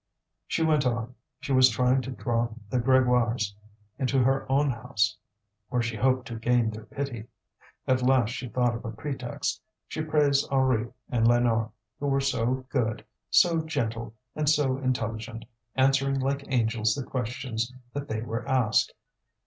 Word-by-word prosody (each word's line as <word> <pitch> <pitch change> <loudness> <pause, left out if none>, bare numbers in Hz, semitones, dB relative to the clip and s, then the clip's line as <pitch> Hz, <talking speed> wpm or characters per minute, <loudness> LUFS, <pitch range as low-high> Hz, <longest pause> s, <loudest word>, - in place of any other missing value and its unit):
She 165 - 0
went 155 -3 +3
on; 120 0 -2 0.3
she - - -4
was 130 0 +7
trying 125 +3 +2
to 130 - -7
draw 120 -2 -1 0.2
the 125 - +2
Grégoires 125 -4 +2 0.5
into 135 0 +1
her 135 +1 +1
own 140 +1 +3
house, 105 -3 0 0.5
where 120 -1 0
she 115 -1 -2
hoped 130 +3 +1
to 115 - -5
gain 120 -1 +2
their 110 0 -9
pity. 125 -6 -5 0.6
At 130 0 +3
last 125 -2 +3
she 125 0 -5
thought 120 +1 +1
of 115 - -6
a 115 - -4
pretext; 125 +1 -4 0.3
she 155 - -4
praised 150 -3 +2
Henri 130 -4 +2 0.2
and 115 -2 +2
Lénore, 120 -2 +3 0.3
who 145 - -2
were 135 0 +2
so 130 -1 0
good, 110 -5 -1 0.2
so 170 -2 +4
gentle, 115 -7 -3 0.2
and 150 -1 +1
so 145 -4 +2
intelligent, 115 -3 -3 0.3
answering 135 +1 +3
like 140 +1 -1
angels 110 -4 +1
the 140 - -3
questions 120 -1 -3 0.2
that 145 0 -4
they 110 -3 -2
were 115 +1 -3
asked. 125 -5 +2
125 Hz, 155 wpm, -27 LUFS, 115-135 Hz, 0.6 s, was